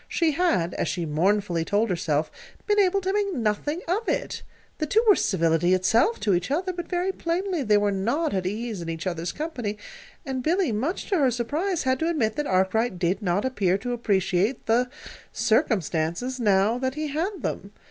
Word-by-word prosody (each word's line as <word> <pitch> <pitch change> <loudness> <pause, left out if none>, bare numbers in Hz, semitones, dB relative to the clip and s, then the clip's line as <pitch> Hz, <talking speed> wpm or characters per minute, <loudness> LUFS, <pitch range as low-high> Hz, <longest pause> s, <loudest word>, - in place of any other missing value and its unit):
She 330 -2 +1
had, 240 - +1
as - - -2
she 175 -2 -2
mournfully 175 +2 +1
told 205 +4 +1
herself, 155 -3 0 0.3
been 415 -1 +2
able 395 0 +3
to 380 +1 -1
make 410 -1 0
nothing 245 - -1
of 400 +7 -1
it. - - -2 0.4
The 310 - -1
two 445 +9 +3
were 415 - +8
civility 170 -1 +2
itself 225 - +2
to 205 - +2
each 175 0 0
other, 365 +6 -1
but 345 -1 -6
very 360 +2 0
plainly 355 -1 -2
they 210 -5 +3
were 205 0 +2
not 235 +11 0
at 185 -2 -1
ease 215 0 -4
in 165 - -5
each 165 +1 -5
other's 170 -1 -2
company; 245 -10 -4 0.5
and 265 -2 -3
Billy, 340 +1 +1
much 260 - -2
to 380 - +3
her 270 -3 +4
surprise, 300 - -1
had 260 0 +1
to 325 - 0
admit 230 -10 0
that 295 -1 -1
Arkwright 190 +3 +1
did 180 +4 0
not 195 +2 0
appear 195 -8 +1
to 245 +5 -4
appreciate 200 0 0
the 245 +3 +2 0.4
"circumstances" 185 - 0
now 210 +1 +3
that 260 +1 -2
he 305 0 -3
had 335 +4 -3
them. 200 - -4
230 Hz, 190 wpm, -25 LUFS, -, 0.5 s, were